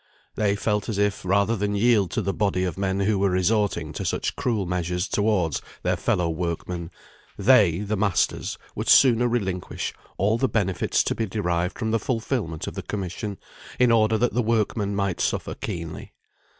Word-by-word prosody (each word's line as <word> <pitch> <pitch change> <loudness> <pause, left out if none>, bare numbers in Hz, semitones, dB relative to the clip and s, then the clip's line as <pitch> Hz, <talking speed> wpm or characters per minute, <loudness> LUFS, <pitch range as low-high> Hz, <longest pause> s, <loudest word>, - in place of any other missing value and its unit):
They 100 -2 +1
felt 105 +1 -1
as 105 - -2
if, 100 -1 0
rather 100 +4 +2
than 105 0 -1
yield 105 -3 +3
to 110 - -2
the 100 +1 -1
body 100 -3 0
of 90 -3 -2
men 95 0 -1
who 100 0 +1
were 100 0 +3
resorting 95 -3 +1
to - - -4
such - - -1
cruel 120 -8 -1
measures 90 +1 -1
towards 95 -6 +1 0.2
their - - +1
fellow 90 -1 0
workmen, 85 +1 -3 0.5
they, 100 -6 +4
the 105 +1 -1
masters, 100 -3 0 0.2
would - - -3
sooner 120 -2 +6
relinquish 95 -7 -2 0.2
all 105 +5 +2
the 130 - +2
benefits 95 -5 +1
to - - 0
be 115 - -2
derived 90 -3 -1
from 110 -2 -2
the 115 - +2
fulfilment 115 - -2
of - - -5
the - - -5
commission, 100 +1 -4 0.4
in 125 -1 +4
order 110 -1 +4
that 120 +2 +1
the 125 - +2
workmen 110 -2 0
might 100 -3 -1
suffer - - -1
keenly. 85 -2 -6
100 Hz, 175 wpm, -24 LUFS, 90-110 Hz, 0.5 s, sooner